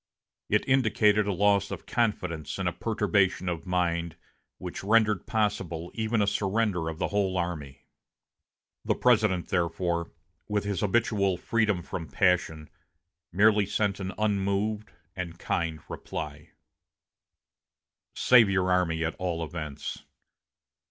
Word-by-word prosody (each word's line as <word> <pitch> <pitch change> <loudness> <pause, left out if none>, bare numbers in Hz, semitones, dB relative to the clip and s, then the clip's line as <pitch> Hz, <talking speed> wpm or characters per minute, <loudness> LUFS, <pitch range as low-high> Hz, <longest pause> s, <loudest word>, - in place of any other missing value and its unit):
It 105 - +1
indicated 105 -5 +3
a - - +1
loss 100 0 +2
of - - -7
confidence 90 -9 -1
and - - -1
a - - 0
perturbation 95 -2 +1
of 90 +1 -3
mind 85 -2 0 0.4
which - - -7
rendered 105 -1 +2
possible 95 -6 -1
even 110 -1 0
a - - +2
surrender 100 -4 0
of 80 - -6
the - - -1
whole 100 -2 0
army. 75 -6 -4 1.0
The - - +1
President, 110 -7 +2
therefore, 85 -1 -1 0.4
with 105 -1 0
his 100 -3 -2
habitual 100 -3 +1
freedom 105 -2 0
from 85 -3 -6
passion, 90 -4 +1 0.6
merely 105 +2 +4
sent 100 -1 0
an 95 -1 -4
unmoved 105 +1 0 0.3
and 85 -3 -5
kind 85 -4 -2
reply: 75 -1 -6 1.7
"Save 120 -5 +6
your 95 -1 +1
army 85 -3 +1
at 80 - -2
all 85 -3 -2
events. 75 -3 -6
95 Hz, 125 wpm, -27 LUFS, 85-105 Hz, 1.7 s, Save